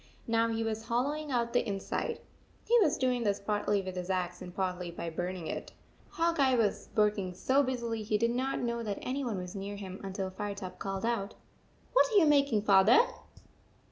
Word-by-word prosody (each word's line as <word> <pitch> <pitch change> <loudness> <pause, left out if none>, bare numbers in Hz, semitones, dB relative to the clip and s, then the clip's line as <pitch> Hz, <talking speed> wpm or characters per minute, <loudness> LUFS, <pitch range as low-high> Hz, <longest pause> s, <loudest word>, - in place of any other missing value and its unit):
Now 230 0 +2
he 225 0 -1
was 220 0 -3
hollowing 290 +6 -1
out 235 -3 0
the 245 - +3
inside. 195 -3 -3 0.5
He 475 - +4
was 310 -8 +3
doing 250 -2 +1
this 205 -3 +1
partly 205 -1 0
with 185 0 -6
his 180 0 -4
axe 180 -1 -1
and 180 -1 -7
partly 180 -1 -2
by 170 0 -5
burning 175 +1 -4
it. - - -5 0.4
Hawk 335 -1 0
Eye 265 -2 +4
was 220 -4 0
working 210 -4 +1
so 265 +8 +3
busily 235 -4 -2
he 215 0 0
did 230 +2 +1
not 260 +3 -1
know 235 -1 -1
that 210 -3 -3
any 270 +2 -2
one 230 -6 -2
was 180 0 -6
near 200 0 -5
him 190 -2 -7
until 190 -1 -4
Firetop 195 -1 -6
called 195 +1 -3
out, 225 -4 -1 0.3
" - - -33
What - - +5
are - - -1
you 360 - +7
making, 280 -8 +3
Father 200 - +6
215 Hz, 200 wpm, -31 LUFS, 190-245 Hz, 0.5 s, you